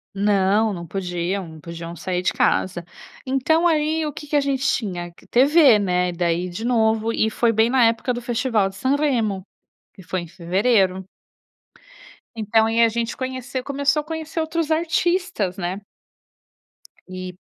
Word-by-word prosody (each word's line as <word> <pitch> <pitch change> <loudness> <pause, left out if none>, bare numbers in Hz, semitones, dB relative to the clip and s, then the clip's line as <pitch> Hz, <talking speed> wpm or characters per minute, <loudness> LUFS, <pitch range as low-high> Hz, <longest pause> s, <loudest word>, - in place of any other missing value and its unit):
Não, 205 +1 +2
não 170 -2 -7
podiam 180 +1 -3
não 160 -1 -12
podiam 170 +1 -8
sair 180 +2 -3
de - - 0
casa. 175 -2 +1 0.4
Então, 305 +6 +2
aí 310 0 +1
o 300 - -4
que - - -8
que 295 - -2
a 290 - +4
gente 275 -1 -1
tinha? 180 -9 -2 0.2
TV, 275 -1 +6
né, 180 -2 +1
e - - -3
daí 175 +1 -1
de 200 +6 -6
novo, 225 -2 +2
e 220 - +1
foi 230 +1 +1
bem 225 +1 +3
na 255 -2 +4
época 230 +2 +1
do 240 - -5
festival 235 -4 0
de 195 - -14
Sanremo, 245 -7 0 0.5
que 190 - -14
foi 180 +2 -3
em 170 - -10
fevereiro. 190 +2 +1 1.3
Então, 220 0 +2
e 225 - -2
aí - - +7
a - - +2
gente 230 +1 -3
conheceu 260 0 -4
começou 280 +2 0
a - - -14
conhecer 320 +1 -5
outros 320 0 -1
artistas, 335 - 0
né. 190 +2 -3 1.3
E 185 -1 -7
220 Hz, 165 wpm, -22 LUFS, 185-270 Hz, 1.3 s, aí